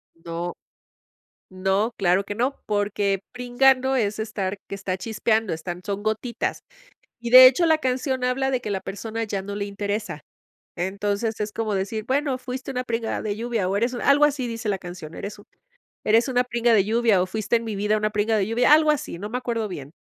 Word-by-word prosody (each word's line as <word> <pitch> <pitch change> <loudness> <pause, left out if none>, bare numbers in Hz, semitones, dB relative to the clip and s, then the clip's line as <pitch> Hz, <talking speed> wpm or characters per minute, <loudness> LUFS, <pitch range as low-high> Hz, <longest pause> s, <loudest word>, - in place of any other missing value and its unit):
No. 170 +1 -5 1.0
No, 190 +5 0
claro 190 0 +3
que 205 - -5
no, 250 +6 -1
porque 205 -1 0
pringando 260 +2 +2
es 215 -4 0
estar 205 -3 -3
que - - -7
está 195 -1 -3
chispeando, 220 -1 0
están 175 +2 -6
son 200 0 -3
gotitas. 220 +3 -2 0.6
Y, 235 - -4
de 255 +1 +11
hecho, 270 +7 +5
la 320 -1 +5
canción 260 -1 -1
habla 265 +2 +1
de 255 -1 0
que 210 - -4
la 195 - -1
persona 225 +4 -4
ya 200 -3 -3
no 200 +1 -6
le 200 0 -3
interesa. 205 +1 -4 0.5
Entonces 200 +4 -2
es 210 0 -2
como 220 -2 -2
decir, 200 +3 -2
bueno, 275 0 0
fuiste 255 +1 -6
una 255 -1 -2
pringa 230 -2 -2
de 205 -1 -2
lluvia 230 -4 -1
o 195 - -1
eres 235 +4 +1
algo 280 +4 +4
así 275 -4 -1
dice 230 -2 -4
la 195 - 0
canción. 175 -3 -9
Eres 205 +1 -7
u - - -14 0.6
eres 225 +3 +3
una 250 -1 +2
pringa 240 -1 +1
de 200 - +5
lluvia 220 -2 +3
o 185 - +1
fuiste 215 +4 -1
en 230 - -6
mi 220 -3 -4
vida 210 +2 +1
una 215 0 0
pringa 215 +1 +1
de 195 -1 0
lluvia, 245 +6 +4
algo 310 0 +6
así, 280 - -3
no 210 +2 -5
me 245 - -2
acuerdo 230 -3 -2
bien. 145 -4 -7
220 Hz, 205 wpm, -24 LUFS, 200-250 Hz, 1.0 s, de